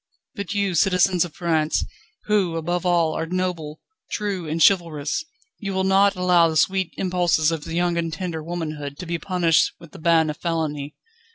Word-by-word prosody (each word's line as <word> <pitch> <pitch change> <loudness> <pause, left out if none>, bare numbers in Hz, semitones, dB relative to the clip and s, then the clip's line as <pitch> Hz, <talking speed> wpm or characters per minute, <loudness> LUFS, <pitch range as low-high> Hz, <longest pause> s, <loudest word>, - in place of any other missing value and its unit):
But 200 +1 -5
you, 200 -2 0
citizens 180 +1 +3
of 165 - -11
France, 160 -3 0 0.4
who, 200 -6 +1
above 175 +2 -1
all, 170 -3 +2
are 165 - -3
noble, 175 -4 -3 0.3
true, 195 -6 -3
and 160 +2 -2
chivalrous, 165 - +2 0.4
you 195 -3 -4
will 190 - +1
not 195 +1 +4
allow 180 -2 +4
the 160 - -1
sweet 190 +1 +1
impulses 175 -4 +2
of 160 -2 -4
young 170 +1 0
and 165 -1 -1
tender 165 0 -4
womanhood 155 -4 -5
to 180 - -7
be 170 0 -3
punished 170 -2 +2
with 170 -3 -14
the - - -12
ban 160 -1 +3
of 150 - -10
felony. 150 -4 -3
170 Hz, 175 wpm, -23 LUFS, 160-185 Hz, 0.4 s, not